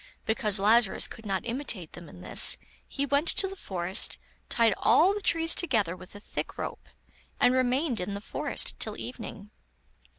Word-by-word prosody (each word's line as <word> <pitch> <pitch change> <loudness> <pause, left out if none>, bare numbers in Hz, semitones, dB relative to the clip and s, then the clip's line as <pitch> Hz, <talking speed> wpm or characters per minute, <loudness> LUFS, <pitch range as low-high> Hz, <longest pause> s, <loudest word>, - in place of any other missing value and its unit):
Because 215 -3 +1
Lazarus 215 +1 +4
could 225 -2 -10
not 195 +1 -2
imitate 230 - -4
them 175 -3 -11
in 90 - -13
this, - - +5 0.3
he 280 - -2
went 285 +4 +1
to 385 - +3
the 390 - -8
forest, 185 - -1 0.3
tied 230 -3 +3
all 370 +5 +4
the 415 - -4
trees 330 -3 +4
together 220 - 0
with 185 +2 -14
a - - -8
thick - - -6
rope, - - -6 0.5
and 250 - +4
remained 255 +1 +1
in 200 +2 -4
the - - -4
forest 205 - -4
till - - -1
evening. 215 -4 -8
230 Hz, 170 wpm, -28 LUFS, 195-280 Hz, 0.5 s, this